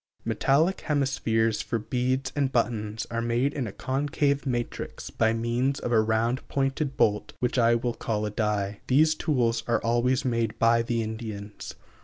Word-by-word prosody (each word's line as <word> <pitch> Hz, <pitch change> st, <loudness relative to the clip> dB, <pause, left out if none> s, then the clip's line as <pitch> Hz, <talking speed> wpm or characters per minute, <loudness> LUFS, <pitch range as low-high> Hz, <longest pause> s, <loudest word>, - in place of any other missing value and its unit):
Metallic 160 Hz, +8 st, +2 dB
hemispheres 115 Hz, -7 st, +1 dB
for 115 Hz, -, -2 dB
beads 130 Hz, +4 st, -1 dB
and 140 Hz, -2 st, +1 dB
buttons 110 Hz, -3 st, -1 dB
are 115 Hz, 0 st, -1 dB
made 120 Hz, +4 st, +1 dB
in 135 Hz, -6 st, -2 dB
a -, -, -5 dB
concave 140 Hz, +3 st, -1 dB
matrix 120 Hz, -2 st, -4 dB
by 110 Hz, -, +2 dB
means 120 Hz, +4 st, 0 dB
of 120 Hz, -, -3 dB
a 110 Hz, -2 st, +5 dB
round 115 Hz, +4 st, +1 dB
pointed 135 Hz, 0 st, -1 dB
bolt 105 Hz, -1 st, +1 dB
which 125 Hz, +1 st, 0 dB
I 115 Hz, 0 st, +5 dB
will 120 Hz, 0 st, -1 dB
call 105 Hz, -2 st, -2 dB
a 105 Hz, -, -3 dB
die. 105 Hz, -2 st, -1 dB
These 155 Hz, +4 st, +4 dB
tools 120 Hz, -7 st, 0 dB
are 115 Hz, -2 st, +2 dB
always 120 Hz, +3 st, +1 dB
made 115 Hz, -2 st, 0 dB
by 115 Hz, +1 st, +4 dB
the 115 Hz, 0 st, -1 dB
Indians. 110 Hz, -2 st, -6 dB
120 Hz, 165 wpm, -27 LUFS, 110-135 Hz, -, a